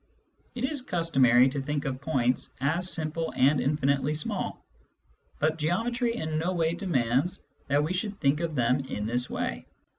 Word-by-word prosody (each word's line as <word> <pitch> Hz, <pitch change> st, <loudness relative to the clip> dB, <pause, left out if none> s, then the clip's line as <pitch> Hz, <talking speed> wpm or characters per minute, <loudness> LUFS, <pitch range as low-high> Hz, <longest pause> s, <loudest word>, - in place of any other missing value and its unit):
It 245 Hz, -, -4 dB
is 270 Hz, +1 st, 0 dB
customary 135 Hz, -, +4 dB
to 140 Hz, +1 st, -3 dB
think 145 Hz, +2 st, -3 dB
of 130 Hz, -1 st, -3 dB
points 130 Hz, -4 st, 0 dB
as 165 Hz, +7 st, +1 dB
simple 160 Hz, 0 st, -1 dB
and 135 Hz, +2 st, +4 dB
infinitely 140 Hz, 0 st, +1 dB
small, 150 Hz, -, -3 dB, 0.7 s
but 155 Hz, +2 st, 0 dB
geometry 230 Hz, +9 st, 0 dB
in 155 Hz, -7 st, -2 dB
no 175 Hz, +3 st, -1 dB
way 165 Hz, -2 st, +1 dB
demands 155 Hz, -, 0 dB, 0.2 s
that 145 Hz, +1 st, +2 dB
we 160 Hz, +4 st, -1 dB
should 200 Hz, +2 st, -3 dB
think 140 Hz, +2 st, +2 dB
of 165 Hz, -2 st, -2 dB
them 125 Hz, +1 st, +2 dB
in 120 Hz, -6 st, -4 dB
this 120 Hz, +2 st, -1 dB
way. 60 Hz, -1 st, -3 dB
150 Hz, 160 wpm, -28 LUFS, 135-170 Hz, 0.7 s, customary